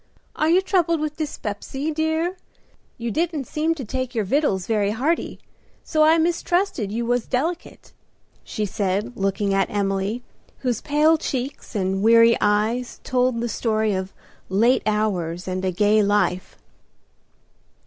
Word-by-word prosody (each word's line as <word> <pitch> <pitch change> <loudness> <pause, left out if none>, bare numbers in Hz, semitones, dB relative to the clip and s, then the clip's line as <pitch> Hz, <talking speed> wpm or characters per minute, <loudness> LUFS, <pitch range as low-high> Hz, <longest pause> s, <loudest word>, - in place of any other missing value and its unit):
Are 310 - +1
you 355 +3 +5
troubled 340 -4 +1
with 300 0 -3
dyspepsy, 280 0 -4
dear? 320 +3 0 0.6
You 235 -1 -3
didn't 315 -1 -1
seem 315 +5 -1
to 275 -6 -6
take 255 +2 -4
your 220 -3 0
vittles 200 - +1
very 210 -3 +1
hearty, 275 +11 -1 0.5
so 310 - 0
I 315 +2 +6
mistrusted 345 - 0
you 235 +2 -2
was 245 0 0
delicate," 325 +7 -3 0.5
she 215 - -3
said, 205 +4 -2
looking 195 0 0
at 195 - +1
Emily, 200 +3 -1 0.4
whose 245 -4 -1
pale 305 +2 +3
cheeks 260 -3 -4
and 190 -1 0
weary 230 +1 +6
eyes 215 +4 0
told 250 -2 +1
the 240 - -1
story 220 -2 0
of 190 0 -3 0.4
late 230 +7 +3
hours 185 -5 -1
and 185 0 -3
a 190 - +1
gay 210 +4 +3
life. 200 -3 0
235 Hz, 140 wpm, -23 LUFS, 205-305 Hz, 0.6 s, I